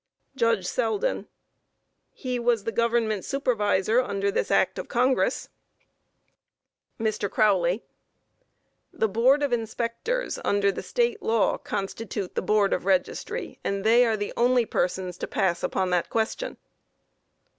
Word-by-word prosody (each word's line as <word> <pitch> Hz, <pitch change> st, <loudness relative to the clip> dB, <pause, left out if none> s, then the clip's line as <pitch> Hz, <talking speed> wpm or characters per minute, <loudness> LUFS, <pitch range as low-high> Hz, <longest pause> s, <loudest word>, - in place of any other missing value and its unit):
JUDGE 230 Hz, -6 st, +1 dB
SELDEN: 255 Hz, -, -1 dB, 0.8 s
He 250 Hz, -1 st, -4 dB
was 235 Hz, -3 st, +1 dB
the 225 Hz, -, -2 dB
Government 230 Hz, -3 st, +1 dB
Supervisor 220 Hz, -4 st, +1 dB
under 200 Hz, -4 st, -1 dB
this -, -, -1 dB
act -, -, +2 dB
of -, -, -6 dB
Congress. 255 Hz, +2 st, +1 dB, 1.5 s
MR. 215 Hz, -2 st, -1 dB
CROWLEY: 195 Hz, -2 st, +2 dB, 1.1 s
The 220 Hz, -, 0 dB
Board 255 Hz, +8 st, +3 dB
of 280 Hz, -3 st, 0 dB
Inspectors, 235 Hz, -, -2 dB
under 200 Hz, 0 st, +2 dB
the -, -, -6 dB
State 470 Hz, -3 st, 0 dB
law, 225 Hz, -, +1 dB
constitute 195 Hz, -1 st, -4 dB
the -, -, -1 dB
Board 205 Hz, +1 st, +2 dB
of -, -, -2 dB
Registry, 190 Hz, -2 st, -1 dB
and 200 Hz, 0 st, -2 dB
they 230 Hz, +3 st, +5 dB
are 225 Hz, -2 st, +1 dB
the 205 Hz, 0 st, -4 dB
only 245 Hz, 0 st, +3 dB
persons 180 Hz, -2 st, -2 dB
to -, -, -3 dB
pass 185 Hz, -5 st, 0 dB
upon 185 Hz, -1 st, -1 dB
that 180 Hz, -1 st, +1 dB
question. 225 Hz, -, -2 dB
220 Hz, 130 wpm, -26 LUFS, 195-245 Hz, 1.5 s, they